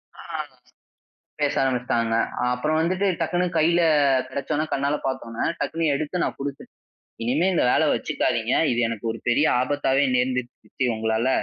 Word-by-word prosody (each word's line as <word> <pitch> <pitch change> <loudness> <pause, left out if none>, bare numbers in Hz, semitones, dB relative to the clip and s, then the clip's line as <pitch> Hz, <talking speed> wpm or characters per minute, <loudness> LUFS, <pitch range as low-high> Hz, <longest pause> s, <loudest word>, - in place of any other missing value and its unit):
அ - - -17 0.2
ஆரம்பிச்சு - - -7 0.8
பேச 145 -1 +1
ஆரம்பிச்சிட்டாங்க. 120 -3 0 0.4
அப்புறம் 155 +6 0
வந்துட்டு 185 +4 +1
டக்குனு 175 +2 0
கையில 170 +2 +3 0.5
கிடச்சவுடன, 140 +3 -2
கண்ணால 140 +2 +1
பார்த்த 130 -3 -3
உடனே, 115 0 -2
டக்குனு 165 0 -2
எடுத்து 155 +5 -2
நான் - - -3
குடுத்துட்டேன். 140 0 -7 0.5
"இனிமே 145 +10 +1
இந்த - - +2
வேல - - +3
வச்சுக்காதீங்க! - - 0 0.2
இது 120 - 0
எனக்கு 115 -1 -6
ஒரு 115 - -8
பெரிய 145 +6 +3
ஆபத்தாவே 140 +1 +1
நேர்ந்துருச்சு. 125 -1 -1
சித்தி 130 - -3
உங்களால. 110 +2 0
135 Hz, 145 wpm, -24 LUFS, 120-155 Hz, 0.8 s, கையில